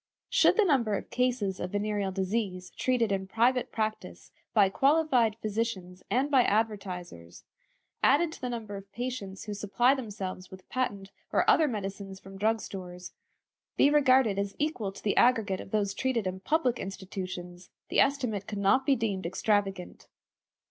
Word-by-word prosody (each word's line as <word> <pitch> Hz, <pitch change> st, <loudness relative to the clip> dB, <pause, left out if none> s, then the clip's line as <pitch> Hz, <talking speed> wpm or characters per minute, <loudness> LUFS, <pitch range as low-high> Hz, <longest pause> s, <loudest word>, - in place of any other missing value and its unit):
Should -, -, +4 dB
the 435 Hz, -, +5 dB
number 245 Hz, -, +2 dB
of -, -, -6 dB
cases 245 Hz, -7 st, 0 dB
of 180 Hz, +2 st, -5 dB
venereal 205 Hz, -1 st, -1 dB
disease 190 Hz, -1 st, -2 dB
treated 245 Hz, -4 st, 0 dB
in 190 Hz, -1 st, -1 dB
private 240 Hz, +5 st, +1 dB
practice 215 Hz, -1 st, -4 dB, 0.2 s
by 205 Hz, -3 st, +5 dB
qualified 270 Hz, -1 st, +3 dB
physicians 210 Hz, -5 st, -3 dB
and 260 Hz, +7 st, +1 dB
by 265 Hz, -3 st, +6 dB
advertisers, 190 Hz, -, -2 dB, 0.6 s
added 310 Hz, +5 st, +4 dB
to 320 Hz, -, -11 dB
the 250 Hz, -, -2 dB
number 220 Hz, -4 st, -5 dB
of 195 Hz, 0 st, -12 dB
patients 235 Hz, -6 st, -5 dB
who 210 Hz, -, -5 dB
supply 210 Hz, +6 st, +2 dB
themselves 200 Hz, -7 st, -5 dB
with 185 Hz, -1 st, -13 dB
patent 200 Hz, -7 st, -2 dB, 0.2 s
or -, -, +2 dB
other 315 Hz, -, +5 dB
medicines 195 Hz, -4 st, -5 dB
from 195 Hz, 0 st, -12 dB
drug 220 Hz, +2 st, +1 dB
stores, 180 Hz, -2 st, -8 dB, 0.6 s
be 285 Hz, -, +5 dB
regarded 260 Hz, -8 st, +4 dB
as 200 Hz, 0 st, -3 dB
equal 290 Hz, -10 st, -2 dB
to 195 Hz, -, -13 dB
the 205 Hz, -, +1 dB
aggregate 225 Hz, -6 st, +3 dB
of -, -, -11 dB
those 200 Hz, -1 st, 0 dB
treated 250 Hz, -4 st, -1 dB
in 185 Hz, 0 st, -3 dB
public 255 Hz, +2 st, +1 dB
institutions, 185 Hz, -2 st, -7 dB, 0.2 s
the -, -, +1 dB
estimate 250 Hz, -8 st, +1 dB
could 210 Hz, -, -5 dB
not 230 Hz, +7 st, +2 dB
be 275 Hz, -, +5 dB
deemed 200 Hz, -7 st, -2 dB
extravagant. 195 Hz, 0 st, -1 dB
210 Hz, 160 wpm, -29 LUFS, 195-250 Hz, 0.6 s, by